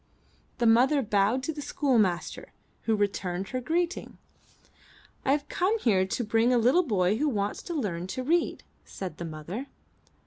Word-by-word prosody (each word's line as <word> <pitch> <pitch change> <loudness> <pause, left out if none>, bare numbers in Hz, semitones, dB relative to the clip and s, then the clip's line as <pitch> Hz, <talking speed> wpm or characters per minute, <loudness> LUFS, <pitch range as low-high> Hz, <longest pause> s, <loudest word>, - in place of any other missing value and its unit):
The 240 - 0
mother 255 +5 +4
bowed 210 +4 +2
to 320 - -2
the 295 - -6
schoolmaster, 225 - 0 0.3
who 225 - +2
returned 195 -2 -2
her 255 - -3
greeting. 335 +6 -2 0.5
*T - - -30 0.6
have 290 +1 +2
come 390 +5 +1
here 195 - +2
to 240 - -2
bring 225 +3 +2
a 250 - +4
little 250 +10 +4
boy 195 -2 +2
who 300 +1 +2
wants 205 -4 -2
to 345 - -5
learn 185 - -2
to 255 +7 -4
read,'* 335 +5 +1 0.2
said 180 -5 -7
the 170 - -4
mother. 165 - -6
230 Hz, 165 wpm, -28 LUFS, 195-280 Hz, 0.6 s, mother